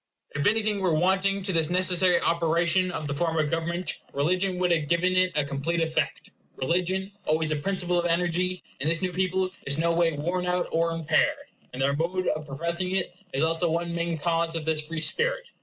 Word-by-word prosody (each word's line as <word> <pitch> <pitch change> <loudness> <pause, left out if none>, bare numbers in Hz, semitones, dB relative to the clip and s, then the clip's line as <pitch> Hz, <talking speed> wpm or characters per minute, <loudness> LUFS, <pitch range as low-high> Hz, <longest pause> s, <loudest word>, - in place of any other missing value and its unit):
If 145 0 0
anything 215 -1 +1
were 180 -4 +1
wanting 190 +3 +1
to 190 -1 -2
this 165 -2 +2
necessary 180 0 +4
operation 170 +2 +2
of 160 -3 -4
the 140 - -2
form 165 +2 -1
of 155 -2 +1
government, 170 +1 -2
religion 180 +6 0
would 180 -1 +1
have 160 -3 +1
given 175 +3 +2
it 185 0 +3
a 150 - +2
complete 140 +5 -2
effect. 160 -1 -1 0.2
Religion, 185 +7 -1 0.2
always 155 0 +1
a - - +1
principle 180 +2 0
of 175 - 0
energy, 180 +2 0 0.2
in 140 - -2
this 165 +3 +1
new 185 - 0
people 185 +1 0 0.2
is 140 +1 0
no 170 +1 +2
way 165 -1 +2
worn 175 +5 -2
out 180 0 0
or 165 +1 +1
impaired; 170 - +1 0.3
and 125 - -8
their 140 +1 +2
mode 180 +4 -1
of 155 0 -3
professing 170 +6 -1
it 190 -2 -1 0.2
is 135 - 0
also 165 +1 +1
one 170 +1 -1
main 170 -1 -1
cause 165 +1 0
of 160 -2 -3
this 160 -1 +1
free 160 +1 -5
spirit. - - 0
170 Hz, 205 wpm, -26 LUFS, 160-185 Hz, 0.3 s, necessary